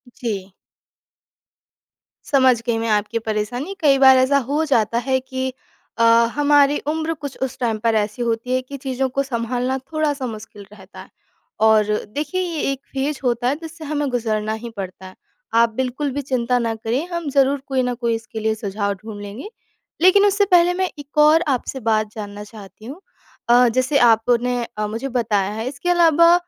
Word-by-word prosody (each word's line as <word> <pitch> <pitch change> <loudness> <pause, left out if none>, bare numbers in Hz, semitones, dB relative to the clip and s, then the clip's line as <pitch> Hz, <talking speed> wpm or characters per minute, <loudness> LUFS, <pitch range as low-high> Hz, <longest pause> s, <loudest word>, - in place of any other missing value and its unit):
जी। 200 -5 -4 1.8
समझ 260 -4 +3
गई 235 -1 +1
मैं 225 0 -2
आपकी 210 +2 0
परेशानी। 230 - -3
कई 280 -3 +4
बार 265 -1 +7
ऐसा 260 +2 +3
हो 295 +3 +1
जाता 230 -6 +1
है 260 0 +3
कि 260 0 -4 0.4
अ, 230 - +2 0.3
हमारी 290 0 +4
उम्र 320 +1 -1
कुछ 285 -4 -8
उस 265 0 -4
टाइम 230 -3 0
पर 225 0 +1
ऐसी 210 +2 -1
होती 235 +1 -2
है, 255 - 0
कि 280 +2 -9
चीज़ों 265 0 -2
को 275 +2 -1
संभालना 250 0 -2
थोड़ा-सा 290 0 -2
मुश्किल 215 -2 -9
रहता 195 -2 -14
है। - - -12 0.6
और 215 -1 +5 0.3
देखिए, 310 +6 -2
ये 340 -4 -3
एक 270 - -4
फ़ेज़ 275 +1 -2
होता 245 -1 0
है, 270 - +1
जिससे 325 0 -9
हमें 295 -1 -2
गुज़रना 220 -3 -1
ही 235 - -5
पड़ता 190 -1 -7
है। 185 - -14 0.5
आप 235 - +4
बिल्कुल 260 +3 -2
भी 285 +2 -3
चिंता 250 -2 0
ना 230 -1 -1
करें, 230 +7 -2
हम 340 -4 -4
ज़रूर 275 0 +2
कोई 265 -2 0
ना 250 0 -1
कोई 235 -1 -1
इसके 225 0 -7
लिए 220 0 0
सुझाव 200 -1 -2
ढूँढ 205 +1 -9
लेंगे। 205 - -8 0.5
लेकिन 370 +3 +6
उससे 405 0 +3
पहले 355 0 +5
मैं 375 +1 -1
एक 290 +1 -12
और 315 +2 +5
आपसे 265 +2 -6
बात 215 -1 +1
जानना 205 -1 -7
चाहती 210 -1 -13
हूँ। 285 +10 -9 0.5
अ, 245 +1 +6
जैसे 255 +4 +1
आपने 240 +2 +2
अ, 210 0 -1
मुझे 225 +5 -4
बताया 205 -4 0
है, 220 +3 -4
इसके 285 +6 -4
अलावा 335 -1 +5
250 Hz, 180 wpm, -20 LUFS, 220-285 Hz, 1.8 s, बार